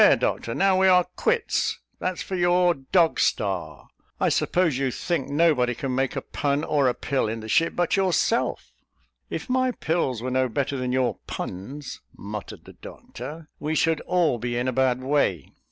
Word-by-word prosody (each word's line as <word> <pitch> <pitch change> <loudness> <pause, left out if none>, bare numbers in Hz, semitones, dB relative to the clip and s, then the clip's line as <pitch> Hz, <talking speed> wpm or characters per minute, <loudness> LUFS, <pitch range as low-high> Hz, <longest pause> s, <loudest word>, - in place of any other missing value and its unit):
"There, - - +7
Doctor; 115 - -2
now 190 -1 +3
we 190 - +5
are 180 -1 +6
quits: 465 -1 0 0.2
that's 185 -1 -2
for 190 - -4
your 175 0 +3
Dog 165 +4 +2
Star. - - -1 0.3
I - - +3
suppose 165 -7 +1
you 135 -1 +1
think 160 +3 -2
nobody 145 -6 +2
can 135 +1 -3
make 135 +1 0
a - - -3
pun 145 +1 -1
or 145 -4 +2
a 125 - +1
pill, 135 -5 -1
in 110 +1 -4
the 110 - -8
ship, 165 +9 +2
but 175 -1 +1
yourself?" 195 +4 +1 0.6
"If - - -5
my 255 0 +2
pills 155 - -1
were 130 - -2
no 130 0 +1
better 140 +4 -1
than 125 -1 -2
your 130 -1 0
puns," 130 +10 -6 0.2
muttered 105 +1 -7
the - - -12
doctor, 150 +6 -10
"we 155 +1 -2
should 160 -1 +2
all 170 -9 +2
be 120 +1 -2
in 125 +1 -1
a 130 - 0
bad 130 0 +1
way." 130 - 0
140 Hz, 185 wpm, -25 LUFS, 125-175 Hz, 0.6 s, There